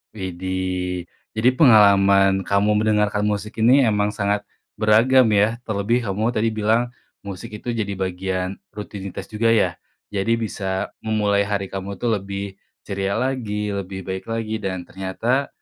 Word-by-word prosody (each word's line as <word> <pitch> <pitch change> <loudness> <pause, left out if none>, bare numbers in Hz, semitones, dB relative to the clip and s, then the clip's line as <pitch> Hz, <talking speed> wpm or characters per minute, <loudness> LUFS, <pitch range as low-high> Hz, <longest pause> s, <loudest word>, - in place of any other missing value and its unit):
Widih, 90 -1 -3 0.2
jadi 110 +3 +3
pengalaman 100 -6 +5
kamu 105 +3 +2
mendengarkan 105 -1 +1
musik 105 0 -2
ini 130 +1 +6
emang 105 -1 +1
sangat 105 -1 -1 0.3
beragam 110 +5 +5
ya, 105 +2 +3
terlebih 110 +3 0
kamu 110 +4 -1
tadi 110 +1 +1
bilang 110 +3 +1 0.3
musik 100 +1 -7
itu 120 +3 -4
jadi 105 -4 -2
bagian 95 0 -3 0.2
rutinitas 100 -1 -7
juga 110 +2 0
ya? 110 - +3 0.4
Jadi 105 +3 +1
bisa 95 -4 -3
memulai 105 -2 +1
hari 100 -2 -2
kamu 95 +1 -5
tuh 120 +4 -1
lebih 100 0 -6 0.2
ceria 100 0 -2
lagi, 105 -6 -2
lebih 95 -1 -5
baik 95 +1 -5
lagi 115 -1 -3
dan 95 -3 -3
ternyata 95 +10 -1
105 Hz, 140 wpm, -22 LUFS, 95-110 Hz, 0.4 s, ini